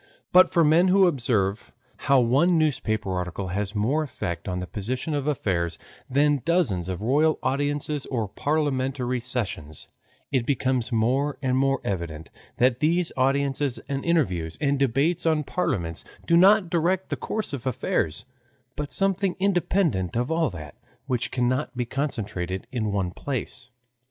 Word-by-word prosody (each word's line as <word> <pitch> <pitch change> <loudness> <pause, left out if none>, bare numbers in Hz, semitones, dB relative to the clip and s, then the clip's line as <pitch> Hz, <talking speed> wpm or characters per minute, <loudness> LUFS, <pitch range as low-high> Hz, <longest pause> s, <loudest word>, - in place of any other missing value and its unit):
But 185 +1 +6
for 170 -2 +4
men 160 +4 +5
who 190 +1 +5
observe 115 - 0 0.3
how 140 -2 +3
one 140 +9 +3
newspaper 110 -10 0
article 90 +1 -3
has 100 +3 -3
more 125 +10 +1
effect 85 - -5
on 90 -1 -2
the 90 - -4
position 125 - -3
of 145 -1 -2
affairs 90 - -1 0.3
than 145 +1 +2
dozens 120 - +1
of 95 +2 -4
royal 150 +6 +3
audiences 145 +1 -1
or 115 -5 -2
parliamentary 130 -1 -1
sessions, 115 - -5 0.4
it 130 -3 +1
becomes 130 -2 0
more 130 +6 +1
and 130 -1 +1
more 135 +1 +2
evident 85 -5 -4 0.3
that 125 0 +3
these 165 +3 +2
audiences 135 0 +1
and 140 -1 -3
interviews 90 - 0
and 140 -2 +1
debates 140 +6 +1
in 155 -2 +2
parliaments 85 - -2 0.2
do 170 - +3
not 190 +1 +5
direct 180 +2 +1
the - - -1
course 215 -8 -4
of 130 -2 -4
affairs, 80 -9 -1 0.5
but 150 -1 -4
something 195 -1 +2
independent 175 - +1
of 125 +5 -1
all 160 -2 +2
that, 75 -7 -9 0.3
which 125 -3 -1
cannot 130 +2 -1
be 125 - 0
concentrated 105 - -3
in 110 -5 -1
one 95 -3 -1
place. 125 +1 -5
130 Hz, 150 wpm, -25 LUFS, 105-150 Hz, 0.5 s, But